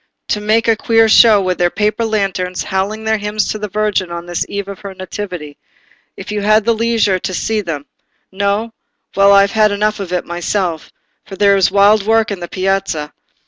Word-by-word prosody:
They 210 - 0
make 215 +2 +1
a 225 - +4
queer 225 +1 +3
show, 220 -1 +6
with 185 -1 -2
their 175 0 +3
paper 210 +4 -1
lanterns, 195 -4 -2
howling 205 +3 -3
their 220 -1 0
hymns 210 +1 -2
to 215 - -3
the 210 - -4
Virgin 205 -2 -1
on 170 0 -6
this 175 -1 -2
eve 200 -1 -4
of 200 -2 -8
her 195 -1 -9
nativity—if 185 -2 -10
you 210 -1 -2
had 215 +1 +3
the 230 - +3
leisure 225 -4 +1
to 185 - -4
see 220 +4 -1
them. 155 -7 -5 0.5
No?—well, 200 0 -1
I 200 0 +7
have 200 0 +1
had 215 -1 +3
enough 210 +1 -1
of 190 -3 -6
it 180 -1 -2
myself, 175 -1 -3 0.3
for 195 - -10
there 200 +1 +4
is 195 -2 +3
wild 200 +2 +4
work 225 -1 +2
in 200 - -4
the 175 - -6
Piazza. 185 -6 -2
200 Hz, 195 wpm, -16 LUFS, 185-215 Hz, 0.5 s, I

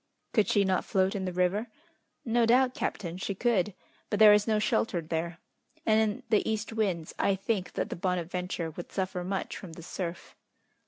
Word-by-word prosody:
"Could 215 -4 +3
she 205 - +3
not 185 -1 +1
float 190 0 +1
in 190 -2 -2
the 185 - -2
river?" 180 +5 +1 0.6
"No 230 0 +3
doubt, 250 +2 +4
captain, 175 -7 -3
she 195 +1 -3
could; 210 -3 +1 0.3
but 205 - 0
there 210 0 +9
is 210 +1 +3
no 215 -1 +3
shelter 210 -3 +1
there, 165 +1 -3 0.5
and 220 0 +4
in 215 -2 -1
the 215 - +3
east 220 0 -2
winds, 190 -8 -1
I 200 - +3
think 195 -1 -2
that - - -2
the - - -2
Bonadventure 180 -1 -2
would 175 +2 -8
suffer 185 -2 -2
much 190 +1 -3
from 175 -4 -9
the 165 - -10
surf." 175 0 -6
190 Hz, 190 wpm, -29 LUFS, 180-215 Hz, 0.6 s, there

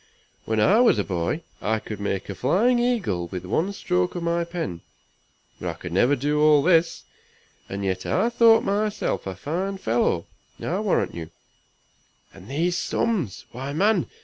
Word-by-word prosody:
when 110 -1 0
I 200 - +5
was 245 - +5
a - - +1
boy 90 - -2 0.2
I 110 +1 +1
could 105 -1 -7
make 100 -1 -2
a 100 - -4
flying 210 - +2
eagle 210 - 0
with 90 +1 -6
one 165 - 0
stroke 90 - -1
of 175 - -3
my 170 0 +1
pen, 165 - -5 0.8
but 85 -2 -4
I - - -3
never 120 +11 +3
could 135 - -2
do 150 +1 +1
all 150 -2 +5
this. 170 -1 +3 0.7
And 100 +1 -4
yet 95 -1 -2
I 235 - +2
thought 230 -1 +5
myself 205 - -1
a 95 - -4
fine 180 - -3
fellow, 110 - 0 0.3
I - - -2
warrant - - 0
you. 80 -2 -7 1.0
And 95 +2 -14
these 170 +6 0
sums! 180 - -1
why 135 +4 -5
man! 200 +3 +2
145 Hz, 170 wpm, -24 LUFS, -, 1.0 s, I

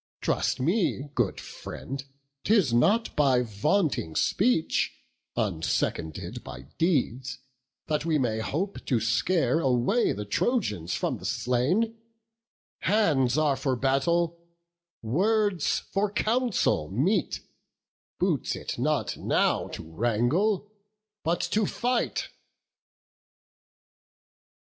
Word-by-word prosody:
Trust - - 0
me, 150 - 0
good 120 -8 0
friend, 135 0 -7 0.4
'tis 200 - +3
not 205 - +3
by 135 -4 +3
vaunting 110 - 0
speech, 205 -6 +1 0.4
Unseconded 80 -6 -2
by - - -8 0.2
deeds, 130 -7 0 0.5
that 150 -2 -1
we 160 -1 +1
may 115 -5 0
hope 180 - -3
To 125 -5 +2
scare 160 - +2
away 135 - +2
the 105 +1 -4
Trojans 105 - 0
from - - -2
the - - -10
slain: 180 - 0 0.8
Hands 150 - +2
are 150 -3 +3
for 130 -1 -1
battle, 165 +7 +1 0.6
words 195 - +1
for 200 +1 +1
council 220 - +1
meet; 165 - 0 0.8
Boots - - 0
it - - -5
not - - 0
now - - +1
to - - -7
wrangle, 120 - +1 0.6
but 170 +2 0
to 210 -2 +1
fight." 245 0 -1
150 Hz, 100 wpm, -27 LUFS, 120-200 Hz, 0.8 s, tis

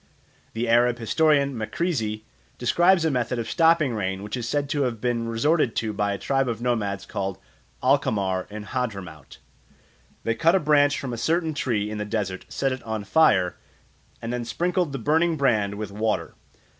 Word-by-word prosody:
The 115 +2 -2
Arab 120 +1 +4
historian 140 +4 +2
Makrizi 110 -2 -2 0.3
describes 175 +8 +3
a 160 - +2
method 125 -1 -1
of 115 - -3
stopping 165 -5 +3
rain 95 -2 -3
which 105 +3 -4
is 120 -2 -4
said 145 -1 0
to 145 - 0
have 120 -4 -1
been 115 -1 -1
resorted 120 +3 +1
to 110 -2 -1
by 100 0 0
a 100 - -2
tribe 135 +6 0
of 115 -2 -3
nomads 105 -5 -1
called 95 -1 -4 0.5
Alqamar 100 -9 +1
in 105 0 -7
Hadramaut. 100 - -5 0.9
They 115 - +1
cut 165 +8 +3
a - - +4
branch 145 -2 +3
from 130 -3 -5
a 115 - -4
certain 160 +4 0
tree 105 -7 -1
in 105 - -4
the - - -1
desert, 105 -3 -3
set 135 -1 -1
it 130 - -4
on 110 -2 -4
fire, 95 - +3 0.7
and 115 +1 -3
then 125 -1 -2
sprinkled 175 +6 -1
the 135 - -3
burning 160 +6 +2
brand 110 -8 +1
with 105 -1 -5
water. 105 -6 -1
120 Hz, 180 wpm, -24 LUFS, 105-145 Hz, 0.9 s, Arab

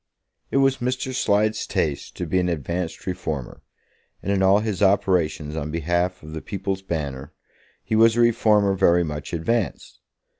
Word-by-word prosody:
It - - 0
was 135 -1 +3
Mr. 125 +1 -2
Slide's 110 -3 +1
taste 70 -2 -2
to - - -3
be 95 - +1
an 90 0 0
advanced 85 +2 -3
reformer, 80 -8 -4 0.6
and 100 - -1
in 100 -1 +1
all 95 +1 +5
his 105 -3 -3
operations 90 -6 +2
on 75 -1 -3
behalf 85 +3 -1
of 80 0 -9
the 80 - -5
People's 95 -1 -4
Banner 75 -6 -4 0.5
he 110 - -1
was 115 +1 +5
a 120 - +3
reformer 110 -4 +3
very 90 -2 +3
much 75 -2 -5
advanced. 100 +7 -2
95 Hz, 160 wpm, -23 LUFS, 80-105 Hz, 0.6 s, all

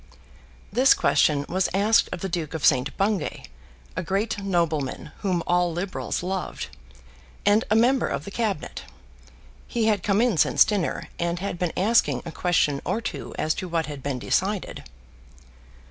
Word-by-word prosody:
This 260 +1 +6
question 145 -2 +2
was 185 +1 0
asked 210 +3 +4
of 170 - -5
the 195 - -2
Duke 165 -3 -3
of 160 - -1
St. 130 0 +3
Bungay, 195 -5 -1 0.5
a - - -1
great 200 +5 -1
nobleman 160 -6 -1
whom 180 -4 0
all 175 0 +2
Liberals 175 +1 -3
loved, 185 0 -4 0.8
and 205 +2 +4
a 215 - +3
member 250 +3 +3
of 145 - -3
the 200 - -7
Cabinet. 215 -2 -2 0.9
He 235 -3 0
had 210 -3 +2
come 200 +2 +1
in 235 -6 +2
since - - +5
dinner, 205 -6 -2
and 170 0 -1
had 180 -1 -4
been 180 -2 0
asking 220 +5 +2
a 165 - -5
question 155 -5 +1
or - - -1
two 230 - -6
as 155 0 +1
to 185 - -5
what 165 -1 0
had 145 -2 -7
been 140 -1 -2
decided. 190 +9 -1
185 Hz, 160 wpm, -25 LUFS, 165-205 Hz, 0.9 s, This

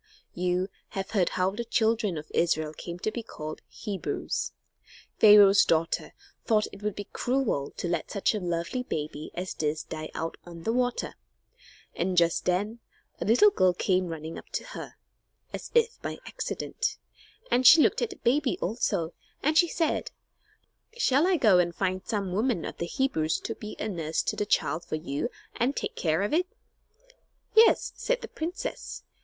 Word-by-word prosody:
You 180 +1 0 0.3
have 195 - -3
heard 195 -5 +2
how 185 +1 +2
the 225 +4 -4
children 220 -5 +1
of 150 - -8
Israel 155 -2 +1
came 170 +2 -7
to 215 - 0
be 235 - -4
called 155 -8 -7
Hebrews. 205 -3 -3 0.7
Pharaoh's 205 -2 +8
daughter 165 0 0 0.3
thought 215 -2 +3
that - - -6
it - - -20
would 210 -1 -2
be 205 - -6
cruel 245 - 0
to - - -2
let 170 -2 -2
such 200 +1 +1
a 215 - -1
lovely 175 +7 -2
baby 155 -8 -4
as 180 0 -3
this 155 0 -1
die 155 0 -6
out 165 +1 -3
on 170 -1 -10
the 225 - 0
water. 245 0 0 0.8
And 180 +1 -1
just 170 -1 +3
then 205 +6 0 0.4
a - - -2
little 250 - +6
girl 185 - +3
came 185 0 +1
running 160 0 -6
up - - -16
to - - -1
her, - - -8 0.6
as - - -6
if 470 0 +2
by - - -4
accident, - - -3 0.5
and 250 +1 +5
she 320 - +10
looked - - +2
at 475 - 0
the 395 - -8
baby 260 -1 +1
also, 175 -5 -1 0.3
and 305 +2 +2
she 345 +2 +6
said: 325 -1 0 0.9
"Shall 290 - +3
I 375 -2 +3
go 210 - +5
and 175 -1 +1
find 185 -1 -1
some 200 -5 -2
woman 215 -3 0
of - - -6
the 170 - -2
Hebrews 170 - 0
to - - -3
be 210 -1 -8
a - - -3
nurse 165 -5 -1
to - - -1
the 210 - -2
child 160 -3 +1
for 170 - -4
you 155 - -3 0.3
and 255 +4 +1
take - - -3
care 160 +2 +1
of 205 - -1
it?" 360 +3 +2 1.1
"Yes," 445 +1 +5
said - - -1
the - - -6
princess. 335 +3 -5
195 Hz, 180 wpm, -28 LUFS, 170-245 Hz, 1.1 s, she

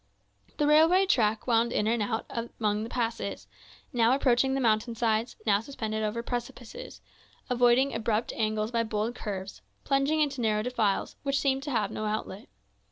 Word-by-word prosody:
The 295 - +2
railway 325 +6 +5
track 220 - +1
wound 235 -1 +2
in 210 - 0
and 230 +1 +1
out 220 +2 -2 0.3
among 210 -1 0
the 225 - -5
passes, 230 -4 -3 0.5
now 235 0 +4
approaching 265 0 +2
the - - 0
mountain 230 -1 +1
sides, 225 0 0
now 200 -2 +3
suspended 220 -3 -4
over 215 +2 -2
precipices, 245 - -6 0.5
avoiding 245 +2 +4
abrupt 225 0 -1
angles 215 0 -1
by 230 -1 +1
bold 220 +1 -2
curves, 195 -5 -6 0.2
plunging 275 +3 +1
into 280 -4 0
narrow 215 -2 +1
defiles, 225 -5 -1
which 280 0 0
seemed 270 -1 +1
to 290 - -6
have 215 -6 0
no 215 - -4
outlet. 210 -2 -4
230 Hz, 165 wpm, -28 LUFS, 215-265 Hz, 0.5 s, railway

